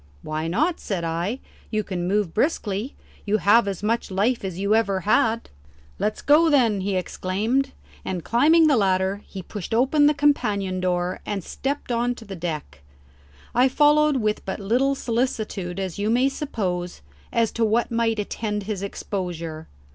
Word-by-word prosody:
"Why 155 +1 -3
not?" 310 - +1
said 185 -5 -3
I. 170 +9 -2 0.3
"You 215 -1 -1
can 180 -3 -3
move 200 -3 0
briskly. 220 - -1 0.3
You 210 +1 +1
have 205 +4 +4
as 195 0 -4
much 230 +2 0
life 205 +6 0
as 190 -3 -4
ever 200 +1 +2
you 190 - -2
had." 230 0 +2 0.5
"Let's 215 - -1
go, 315 +3 +5
then," 235 -9 +3
he 195 0 -1
exclaimed, 215 +9 -1 0.3
and 180 -3 -4
climbing 305 - +4
the 290 -4 +4
ladder 190 0 +1
he 190 -2 -8
pushed 205 +3 -5
open 285 +5 +4
the 300 - +3
companion 210 -10 +1
door 180 0 -1
and 200 -3 -3
stepped 275 - -4
on 240 +1 0
to 230 - -12
the 195 -2 -7
deck. 155 - -5 0.7
I 250 +3 +4
followed 295 +1 +4
with 215 -3 -1
but 190 - -4
little 250 +7 +1
solicitude, 220 -7 -2
as 190 -1 -4
you 205 +1 0
may 250 +4 +3
suppose, 185 - -3 0.3
as 230 -1 +1
to 230 - -1
what 225 +2 +1
might 230 -1 +1
attend 210 0 -3
his 200 -1 -4
exposure. 175 -5 -5
210 Hz, 165 wpm, -24 LUFS, 185-245 Hz, 0.7 s, go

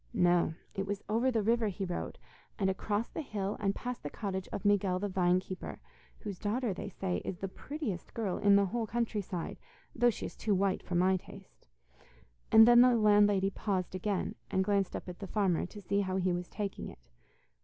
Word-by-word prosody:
No, 175 -4 +3 0.2
it 195 0 -3
was 205 0 -3
over 230 +5 +2
the 225 -4 +1
river 230 +1 +2
he 195 0 -3
rode, 175 -1 -4 0.4
and 190 -1 +2
across 205 +3 -1
the - - -5
hill 205 -7 -3
and 200 -1 0
past 250 0 -5
the 145 - -5
cottage 190 -1 -4
of 205 - -5
Miguel 200 -2 +3
the 205 +2 -2
vine 180 -2 +2
keeper, 185 0 -7 0.4
whose 200 -4 -6
daughter, 220 +1 -1
they 185 - -6
say, 185 -1 -2
is 180 - -5
the 195 - -3
prettiest 230 - -5
girl 210 -6 -1
in 200 -1 +5
the 200 0 +5
whole 225 +3 -2
country 230 -2 -1
side, 180 -3 -5 0.3
though 240 0 +4
she 230 - -4
is - - -7
too 210 -2 0
white 190 0 +1
for 180 - -4
my 185 +2 +4
taste,' 195 - -14 0.8
and 220 +1 +9
then 240 0 +8
the 250 -1 +6
landlady 205 -3 +4
paused 190 -3 -2
again, 190 +1 -1 0.2
and 190 - +1
glanced 200 -1 +1
up - - -6
at 180 -1 -7
the 195 - -6
farmer, 185 -4 +1
to 210 - -10
see 200 +1 0
how 185 -1 -2
he 185 -1 +1
was 175 0 -3
taking 205 -2 -4
it. - - -16
200 Hz, 205 wpm, -32 LUFS, 185-215 Hz, 0.8 s, and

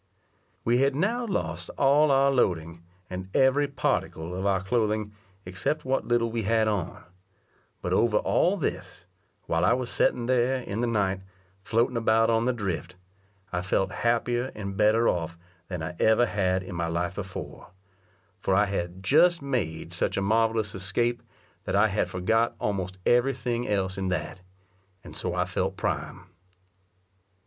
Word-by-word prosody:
We 120 +2 +3
had 135 0 +2
now 230 - 0
lost 195 - -3
all 145 +2 +4
our 135 0 +4
loading; 85 -9 0 0.3
and 95 0 -6
every 135 +2 +4
particle 90 - -2
of 95 +2 -1
our 95 -1 +1
clothing, 105 -1 0 0.3
except 95 - -2
what 130 +1 0
little 120 -1 +1
we 115 0 -1
had 110 +1 +2
on; 100 -6 -2 0.8
but - - -1
over 115 -2 +3
all 190 +4 +2
this, 160 - -4 0.4
while 80 +1 0
I - - +5
was 125 -1 -2
setting 120 - +1
there, 125 +1 +2
in 105 -2 -5
the 120 - +1
night, 100 -4 0 0.4
floating 115 +3 +1
about 115 0 +3
on 115 0 +2
the 125 - +3
drift, 95 -6 -4 0.6
I 90 - 0
felt 95 +1 0
happier 120 +2 0
and 100 -2 -5
better 110 +3 +3
off 85 -1 -1 0.3
than 90 -4 -5
I 85 +2 -4
ever 110 +2 +4
had 95 -4 0
in 90 - -8
my 85 0 -1
life 85 +2 -1
before, 95 -5 -7 0.7
for 95 0 +1
I 105 +2 +4
had 95 -2 -4
just 175 - +4
made 90 - -3
such 90 - -1
a - - +1
marvellous 110 0 +1
escape, 110 +5 -1 0.4
that - - -1
I 105 +2 +4
had 100 +2 0
forgot 115 +6 +1
almost 95 -2 -2
every 120 +2 +3
thing 120 -1 -2
else 95 -2 -1
in 95 - -2
that; 90 0 -3 0.6
and - - -11
so - - -2
I - - +1
felt - - -2
prime. - - -3
110 Hz, 160 wpm, -27 LUFS, 95-120 Hz, 0.8 s, I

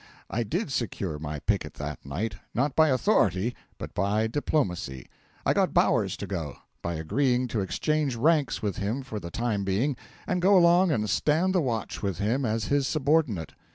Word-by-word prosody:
I 120 - 0
did 155 - -2
secure 95 - -2
my 75 0 -4
picket - - -1
that - - -6
night 95 +9 -3 0.2
not 135 +3 +1
by 160 0 +6
authority, 120 - +2 0.2
but - - -7
by 100 +3 +1
diplomacy. 95 - -1 0.4
I - - +4
got - - +1
Bowers - - +3
to - - -5
go, 80 -8 -4 0.3
by 85 0 -3
agreeing 125 - +1
to 110 -3 -1
exchange 150 +7 0
ranks 145 +2 +2
with 100 -3 -1
him 110 +7 -2
for 115 -5 -5
the 85 -3 -7
time 110 0 -1
being, 105 +9 0 0.3
and 180 -1 -1
go 195 +2 +6
along 175 +1 +5
and 105 -7 0
stand 155 - +2
the 180 - +3
watch 115 -7 -3
with 95 -5 -2
him 120 +8 0
as 110 -1 0
his 140 -2 +1
subordinate. 145 - +1
115 Hz, 180 wpm, -27 LUFS, 100-145 Hz, 0.4 s, by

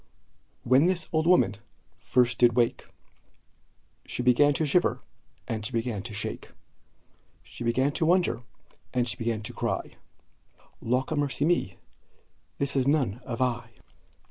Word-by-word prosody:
When 130 +7 +4
this 180 -3 -1
old 160 +1 +1
woman 175 - +4 0.4
first 125 -1 +1
did 120 -1 +5
wake, 120 0 0 1.2
She 125 - -3
began 125 +4 +5
to 155 - 0
shiver, 145 -4 +2 0.5
and 110 -3 -3
she 105 - -5
began 115 -3 -2
to 110 +2 -8
shake; - - -5 0.9
She - - -9
began 130 +4 +1
to 160 +2 0
wonder, 175 -9 +2 0.5
and 125 -1 +1
she 115 - -3
began 115 -3 -2
to - - -6
cry - - -2 0.9
"Lawkamercyme, 140 - 0 0.8
this 140 0 -1
is 135 -1 +2
none 130 -6 +1
of 120 +1 -1
I!" 120 -2 -2
125 Hz, 130 wpm, -27 LUFS, 115-145 Hz, 1.2 s, did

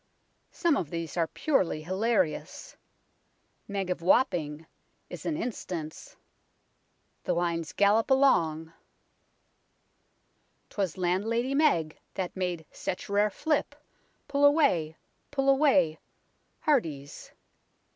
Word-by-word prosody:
Some 335 -5 +1
of 165 - -3
these 165 -1 -5
are 170 -2 +1
purely 185 - 0
hilarious. 190 0 -1 0.5
" - - -44 0.3
Meg 195 -2 -3
of 180 - -3
Wapping 165 - +1 0.2
" - - -44
is - - -7
an 305 - -1
instance; 180 - -6 1.1
the - - 0
lines 170 -2 -1
gallop 205 +4 +3
along 165 - +2 1.0
" - - -44
'Twas 195 -5 -2
Landlady 220 +8 0
Meg 275 - +2 0.2
that 185 -2 -3
made 180 -4 -3
such 180 - -5
rare 205 +1 +3
flip 300 +8 -1 0.5
Pull 280 0 0
away, 280 - +3 0.3
pull 275 -1 -1
away, 270 - +4 0.6
hearties 160 - -1
190 Hz, 105 wpm, -28 LUFS, 165-265 Hz, 1.1 s, away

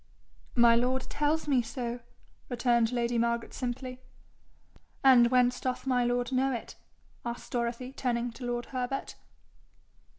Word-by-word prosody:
'My 235 -1 +6
lord 250 +2 +1
tells 300 +2 0
me 265 -4 +3
so,' 235 +1 -4 0.5
returned 240 -2 +2
lady 240 -1 0
Margaret 235 0 -1
simply. 255 0 -4 1.0
'And 250 -3 +7
whence 250 0 +3
doth 255 0 -3
my 250 -2 +2
lord 245 +1 0
know 265 +1 +2
it?' 240 - -5 0.5
asked 235 0 -6
Dorothy, 240 +2 -2
turning 245 -2 -1
to 230 +3 -11
lord 240 0 -2
Herbert. 255 +1 -3
245 Hz, 130 wpm, -29 LUFS, 235-255 Hz, 1.0 s, And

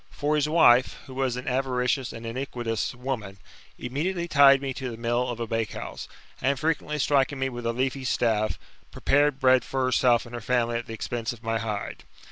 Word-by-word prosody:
For 150 +1 -1
hi? 150 +1 0
wife, 130 -6 +5
who 130 - -10
was 130 -2 -1
an 125 - -6
avaricious 125 0 0
and 115 0 -9
iniquitous 120 -2 -3
woman, 120 -6 -5 0.4
immediately 170 +8 -2
tied 140 -3 +6
me 135 -1 -3
to 130 -1 -5
the 115 - -7
mill 120 +2 0
of 120 -1 -4
a 115 - -2
bakehouse, 115 -1 -4 0.3
and, 135 +1 +1
frequently 155 -1 -1
striking 140 0 +2
me 135 0 -1
with 120 -2 -5
a - - +2
leafy 130 +2 -2
staff, 110 -4 +1 0.3
prepared 145 -1 +2
bread 130 -1 +4
for 130 -1 -1
herself 125 -2 +3
and 120 - -12
her 120 - -5
family 120 0 0
at 120 - -9
the 115 - -6
expense 120 +1 -3
of 115 0 -15
my 115 0 -1
hide. 105 -3 -4
125 Hz, 195 wpm, -26 LUFS, 115-135 Hz, 0.4 s, tied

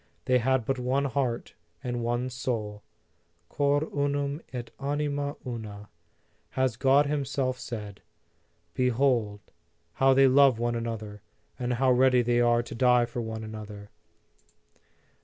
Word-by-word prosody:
They 125 -1 +3
had 130 0 +1
but 135 +1 -1
one 130 +3 0
heart 130 -3 -2 0.3
and 120 -1 -3
one 120 +2 -1
soul: 110 -5 -3 0.7
Cor 145 +1 +1
unum 145 +1 -1
et 125 -2 -6
anima 145 0 -2
una, 105 -4 -7 0.7
has 130 -3 +1
God 135 +4 +4
himself 135 -3 -1
said. 105 -4 -7 0.7
Behold 125 -5 +1 0.5
how 135 0 +4
they 135 0 +6
love 135 -2 +5
one 120 +1 -1
another, 110 -3 -5 0.4
and 125 0 -1
how 130 +2 +2
ready 125 0 +4
they 120 0 +2
are 120 0 +3
to 120 - -9
die 125 0 +4
for 120 0 -5
one 110 -1 -5
another 105 -2 -9
125 Hz, 130 wpm, -27 LUFS, 115-135 Hz, 0.7 s, they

